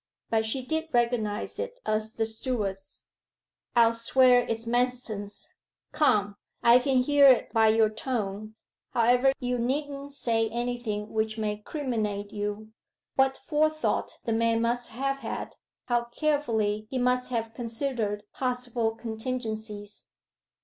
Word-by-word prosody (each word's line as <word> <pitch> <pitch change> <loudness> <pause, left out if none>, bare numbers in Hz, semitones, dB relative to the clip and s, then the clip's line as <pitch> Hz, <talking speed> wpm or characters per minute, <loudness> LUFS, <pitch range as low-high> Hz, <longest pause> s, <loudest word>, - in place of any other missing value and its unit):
But 220 -1 +2
she 255 +3 0
did 320 +2 -2
recognize 235 -3 0
it - - -5
as 215 +1 -1
the 225 - 0
steward's. 220 -4 -4 0.7
'I'll 230 -1 +6
swear 245 +1 +4
it's 225 0 -2
Manston's! 240 -4 -2 0.4
Come, 205 -10 +2 0.3
I 235 +1 +7
can 255 0 +2
hear 285 +1 +6
it 260 -2 +4
by 225 -1 +5
your 220 0 +5
tone. 215 -2 -4 0.4
However, 245 +3 +4
you 250 -1 -1
needn't 280 +3 -2
say 225 -5 +1
anything 235 -3 -3
which 220 0 0
may 210 -1 -1
criminate 215 -5 -3
you. 210 +1 -4 0.5
What 270 0 +3
forethought 310 +3 0
the 230 - 0
man 230 0 +2
must 240 +1 -1
have 275 +4 -2
had - - -5 0.3
how 240 -1 +1
carefully 230 -7 0
he 260 - -3
must 250 0 +1
have 225 -2 -2
considered 230 -3 -2
possible 245 -3 -1
contingencies! 220 -3 -5
235 Hz, 130 wpm, -27 LUFS, 220-255 Hz, 0.7 s, I